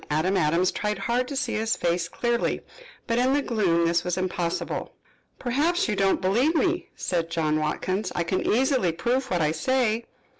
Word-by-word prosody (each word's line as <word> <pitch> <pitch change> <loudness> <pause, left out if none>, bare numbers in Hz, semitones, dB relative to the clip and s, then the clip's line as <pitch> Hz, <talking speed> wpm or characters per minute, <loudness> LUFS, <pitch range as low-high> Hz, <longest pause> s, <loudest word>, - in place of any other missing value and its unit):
Adam 160 +6 +1
Adams 170 +2 +2
tried 210 0 -2
hard 245 +2 0
to 280 - -5
see 270 - -1
his 220 +1 0
face 170 0 0
clearly, 240 -1 -1 0.4
but 230 -1 0
in 255 +2 +3
the 290 - +2
gloom 180 -9 +1
this 170 +1 +2
was 180 0 -2
impossible. 180 -2 -2 0.4
"Perhaps 295 +8 +1
you 210 - 0
do 195 - +2
not 195 - +2
believe 240 - +2
me," 350 +2 +1
said 170 -2 -2
John 155 -2 0
Watkins. 185 +5 -2
"I 175 - +1
can 185 +2 -1
easily 250 - +2
prove 255 +9 -1
what 175 -5 +1
I 150 - +2
say." 235 +5 0
195 Hz, 185 wpm, -25 LUFS, 170-250 Hz, 0.4 s, in